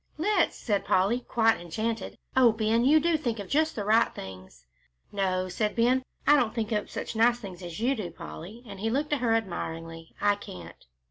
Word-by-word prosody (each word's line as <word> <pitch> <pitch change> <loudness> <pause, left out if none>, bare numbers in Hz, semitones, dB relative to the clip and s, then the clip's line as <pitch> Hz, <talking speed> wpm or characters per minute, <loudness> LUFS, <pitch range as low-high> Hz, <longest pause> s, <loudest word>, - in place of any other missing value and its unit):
"Let's," 365 +3 +2
said 205 -3 -1
Polly, 195 +6 +2
quite 225 -4 +2
enchanted. 220 +5 -3 0.2
"Oh, 255 -3 +6
Ben, 220 +1 +1
you 305 +4 +6
do 330 +1 +2
think 240 -7 -2
of 200 -2 -6
just 310 +6 +1
the 205 - -3
right 220 +2 +4
things." 95 -10 -10 0.5
"No," 185 -2 0
said 210 +4 -1
Ben, 250 +3 +3 0.2
"I 295 - +7
don't 245 -6 +1
think 225 -1 -1
up 210 -1 -1
such - - -5
nice 235 +2 +4
things 190 -6 -9
as 175 0 -7
you 245 +4 +2
do, 210 -9 -4
Polly," 185 +7 -10
and 200 -3 -9
he 220 +3 -1
looked 290 +5 0
at 290 - +1
her 230 -2 +3
admiringly; 165 -5 -5
"I 205 0 +3
can't." 85 - -11
220 Hz, 200 wpm, -28 LUFS, 185-240 Hz, 0.5 s, I